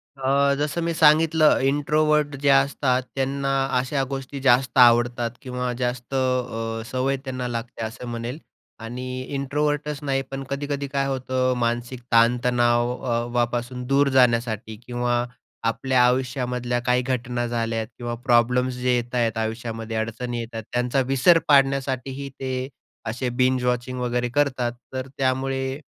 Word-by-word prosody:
अ, 140 +1 +2
जसं 150 +3 -1
मी 170 0 -1
सांगितलं 155 0 +5
इंट्रोव्हर्ट 145 +1 +2
जे 145 - +3
असतात, 135 -2 +3
त्यांना 135 +1 -1 0.3
अशा 135 +2 -1
गोष्टी 135 0 -5
जास्त 130 0 +3
आवडतात 120 -1 +5
किंवा 125 -1 -3
जास्त 125 +1 -3
अ, 125 -4 -1
सवय 135 +1 0
त्यांना 130 -1 -3
लागते 115 -1 -5
असं 120 +2 -7
म्हणेल. 120 +4 -5 0.4
आणि 125 +3 -5
इंट्रोव्हर्टच 145 +1 -1
नाही 135 -1 0
पण 135 0 -4
कधी-कधी 140 0 -3
काय 140 0 -1
होतं 130 -1 0
मानसिक 120 +1 -2
ताण-तणावापासून 120 0 +1
दूर 140 +1 +3
जाण्यासाठी 115 -3 +2
किंवा 120 0 0 0.4
आपल्या 125 +2 +2
आयुष्यामधल्या 125 -1 0
काही 125 0 +3
घटना 125 -1 -2
झाल्या 115 -1 -1
किंवा 120 +2 -6
प्रॉब्लेम्स 125 +1 +3
जे 125 0 0
येत 120 +1 -3
आहेत 115 -2 +1
आयुष्यामध्ये 115 0 -4
अडचणी 120 +2 -3
येतात, 115 -1 -6
त्यांचा 125 +2 +1
विसर 135 +6 +5
पाडण्यासाठीही 135 -1 +1
ते 130 -1 -3 0.4
असे 125 +2 -2
बिंज 130 0 +3
वॉचिंग 125 +1 -1
वगैरे 125 0 -1
करतात. 130 -3 0 0.2
तर 130 0 -4
त्यामुळे 135 +1 -1
125 Hz, 130 wpm, -23 LUFS, 120-135 Hz, 0.4 s, सांगितलं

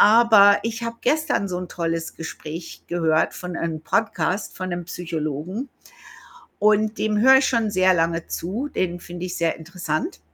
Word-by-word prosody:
Aber 215 -2 +7
ich 230 +1 -3
habe 230 0 -4
gestern 310 -9 +1
so 180 -1 -3
'n 180 - -5
tolles 165 -1 -3
Gespräch 165 +1 -8
gehört 160 -2 +1
von 180 -1 -6
einem 160 -2 -3
Podcast 190 +1 -1
von 185 0 -4
'nem 175 0 -4
Psychologen 170 - -4 0.9
und 215 +1 +3
dem 215 -1 +1
höre 265 +4 +7
ich 265 - +1
schon 230 -4 +1
sehr 185 0 +4
lange 165 0 0
zu, 215 - -3
den 175 -6 -2
finde 175 +1 -7
ich 180 - -5
sehr 165 -1 0
interessant. 160 - -4
180 Hz, 165 wpm, -23 LUFS, 165-215 Hz, 0.9 s, Aber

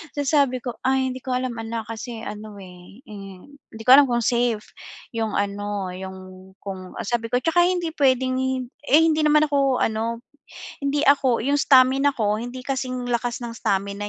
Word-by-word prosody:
tapos 285 -2 -1
sabi 280 -4 +3
ko, 245 - -3 0.2
ay 265 0 +1
hindi 255 - -7
ko 260 - -5
alam, 255 0 -2
anak, 225 0 -4
kasi 230 0 -7
ano, 210 0 -8
eh, 180 +6 -14
hmm, 195 -6 -11 0.3
hindi 225 - -8
ko 250 - +4
alam 280 +1 +8
kung 240 -1 0
safe 235 -3 0 0.5
'yong 225 -2 -2
ano, 200 -1 -3
'yong 185 0 -10
kung 190 -2 -8
sabi 230 +1 -2
ko, 245 - +2
tsaka 345 +3 +3
hindi 350 -3 -1
puwedeng 260 -3 +1 0.5
eh, 305 +3 +6
hindi 315 -1 +2
naman 300 0 +4
ako 275 -3 +2
ano, 230 +2 -2 0.6
hindi 280 +1 0
ako 270 -4 +3
'yung 280 +3 +1
stamina 270 +1 +4
ko 210 -3 +1
hindi 245 +2 -7
kasing 255 -2 -3
lakas 240 0 -1
ng 230 -1 -6
stamina 200 -1 -2
240 Hz, 175 wpm, -23 LUFS, 205-270 Hz, 0.6 s, alam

